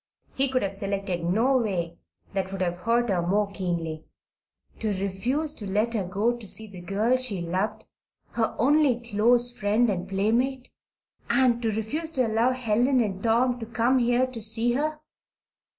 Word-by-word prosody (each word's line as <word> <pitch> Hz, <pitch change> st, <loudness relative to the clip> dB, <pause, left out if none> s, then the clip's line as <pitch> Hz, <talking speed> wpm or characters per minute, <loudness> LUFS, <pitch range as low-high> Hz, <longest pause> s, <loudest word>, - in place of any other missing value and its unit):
He 270 Hz, +1 st, +2 dB
could 255 Hz, -2 st, 0 dB
have 195 Hz, -, -2 dB
selected 195 Hz, -3 st, -3 dB
no 225 Hz, +10 st, +2 dB
way 175 Hz, -8 st, -2 dB, 0.3 s
that 190 Hz, -1 st, -2 dB
would 195 Hz, -1 st, -5 dB
have 175 Hz, -1 st, 0 dB
hurt 230 Hz, +6 st, 0 dB
her 180 Hz, -2 st, +1 dB
more 200 Hz, +4 st, 0 dB
keenly. 170 Hz, -5 st, -4 dB, 0.7 s
To 220 Hz, -, -1 dB
refuse 245 Hz, +11 st, -1 dB
to 205 Hz, -9 st, -7 dB
let 215 Hz, +4 st, 0 dB
her 215 Hz, -4 st, 0 dB
go 205 Hz, +6 st, 0 dB
to 235 Hz, -4 st, -10 dB
see 220 Hz, +4 st, 0 dB
the 195 Hz, -4 st, -11 dB
girl 210 Hz, +8 st, +1 dB
she 255 Hz, -7 st, -1 dB
loved 190 Hz, +6 st, -2 dB, 0.5 s
her 225 Hz, -2 st, -1 dB
only 275 Hz, -1 st, +3 dB
close 240 Hz, +2 st, +2 dB
friend 215 Hz, +3 st, +2 dB
and 185 Hz, 0 st, -4 dB
playmate! 240 Hz, +7 st, 0 dB, 0.6 s
And 245 Hz, -3 st, +3 dB
to 225 Hz, -, 0 dB
refuse 220 Hz, +10 st, -2 dB
to 255 Hz, -4 st, +2 dB
allow 225 Hz, +2 st, +2 dB
Helen 250 Hz, +1 st, +1 dB
and 195 Hz, -5 st, -1 dB
Tom 245 Hz, +3 st, +2 dB
to 225 Hz, -, -6 dB
come 235 Hz, +3 st, +2 dB
here 245 Hz, +1 st, +2 dB
to 255 Hz, -3 st, -8 dB
see 225 Hz, +2 st, +2 dB
her! 300 Hz, +4 st, -1 dB
225 Hz, 170 wpm, -26 LUFS, 195-245 Hz, 0.7 s, only